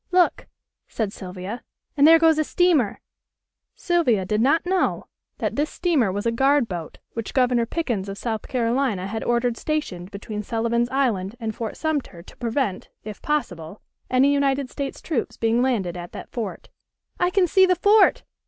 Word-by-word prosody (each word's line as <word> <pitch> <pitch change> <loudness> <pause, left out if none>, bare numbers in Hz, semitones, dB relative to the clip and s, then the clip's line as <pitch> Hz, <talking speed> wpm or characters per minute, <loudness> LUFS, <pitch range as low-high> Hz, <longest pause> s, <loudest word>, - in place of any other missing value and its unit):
Look!" 360 -1 +2 0.4
said 215 -3 -3
Sylvia, 185 +4 -7 0.3
"and 285 0 +6
there 330 +1 +9
goes 320 -1 +4
a - - +3
steamer." 310 - +2 0.7
Sylvia 255 - +1
did 210 +3 0
not 290 +8 +3
know 370 +1 0 0.3
that - - -2
this 295 +1 +1
steamer 290 - +1
was 205 +3 -3
a 230 - +2
guard 270 +2 +3
boat 170 -5 -6 0.2
which 230 -2 -5
Governor 250 -3 +2
Pickens 235 - -2
of 195 - -6
South 220 -2 -4
Carolina 235 -5 0
had 220 +3 -4
ordered 240 0 0
stationed 190 - -3
between 210 +1 -6
Sullivan's 235 +2 0
Island 230 -7 0
and 225 -2 -3
Fort 225 0 -5
Sumter 290 - -3
to - - -16
prevent, 230 -4 -2
if 215 -1 -8
possible, 195 - -3 0.3
any 265 +3 +4
United 275 -2 0
States 280 -1 -5
troops 295 -8 -2
being 230 +1 +2
landed 215 -9 0
at 175 0 -8
that - - -9
fort. 225 -5 -5 0.5
"I 355 - +3
can 370 0 +3
see 375 +2 +4
the 365 - +3
fort!" 405 +3 +4
240 Hz, 170 wpm, -23 LUFS, 210-295 Hz, 0.7 s, there